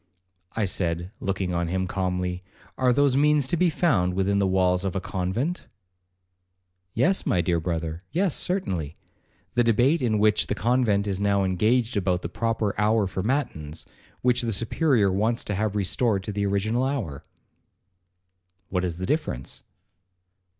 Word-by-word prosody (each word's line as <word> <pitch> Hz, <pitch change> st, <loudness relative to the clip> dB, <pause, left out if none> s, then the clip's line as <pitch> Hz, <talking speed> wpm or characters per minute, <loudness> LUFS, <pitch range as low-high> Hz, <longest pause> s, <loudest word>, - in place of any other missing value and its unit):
I 110 Hz, -, 0 dB
said, 85 Hz, -1 st, -2 dB
looking 95 Hz, -2 st, -2 dB
on 85 Hz, 0 st, 0 dB
him 95 Hz, +2 st, -1 dB
calmly, 90 Hz, -1 st, -2 dB, 0.3 s
'Are 130 Hz, -1 st, +2 dB
those 140 Hz, +1 st, +3 dB
means 150 Hz, 0 st, +3 dB
to 135 Hz, -, 0 dB
be 175 Hz, +1 st, +3 dB
found 110 Hz, -, +1 dB
within 100 Hz, +1 st, +1 dB
the 100 Hz, -, +2 dB
walls 90 Hz, -1 st, +2 dB
of 95 Hz, -1 st, -2 dB
a -, -, +1 dB
convent?' 105 Hz, -, -3 dB, 1.3 s
'Yes, 185 Hz, -, +2 dB
my 90 Hz, -, +1 dB
dear 85 Hz, 0 st, +1 dB
brother,—yes, 85 Hz, -, -2 dB
certainly,—the 95 Hz, -, -4 dB
debate 120 Hz, +8 st, +3 dB
in 110 Hz, -4 st, +1 dB
which 105 Hz, 0 st, +3 dB
the -, -, -1 dB
convent 115 Hz, -4 st, +1 dB
is 95 Hz, -2 st, -2 dB
now 100 Hz, -1 st, +2 dB
engaged 110 Hz, +6 st, +1 dB
about 90 Hz, -2 st, 0 dB
the -, -, -3 dB
proper 110 Hz, 0 st, -1 dB
hour 110 Hz, 0 st, +3 dB
for 95 Hz, 0 st, -3 dB
matins, 90 Hz, -, -2 dB, 0.4 s
which 125 Hz, 0 st, +3 dB
the 115 Hz, -2 st, -1 dB
Superior 115 Hz, -, +2 dB
wants 110 Hz, +5 st, +1 dB
to 105 Hz, -, -3 dB
have 105 Hz, +1 st, -1 dB
restored 100 Hz, +1 st, +1 dB
to 105 Hz, -, -4 dB
the 100 Hz, 0 st, -1 dB
original 110 Hz, +5 st, 0 dB
hour.' 120 Hz, -, -2 dB, 1.5 s
'What 90 Hz, -1 st, -1 dB
is 85 Hz, -2 st, -2 dB
the 95 Hz, -, -3 dB
difference?' 95 Hz, -, -3 dB
100 Hz, 150 wpm, -25 LUFS, 90-120 Hz, 1.5 s, those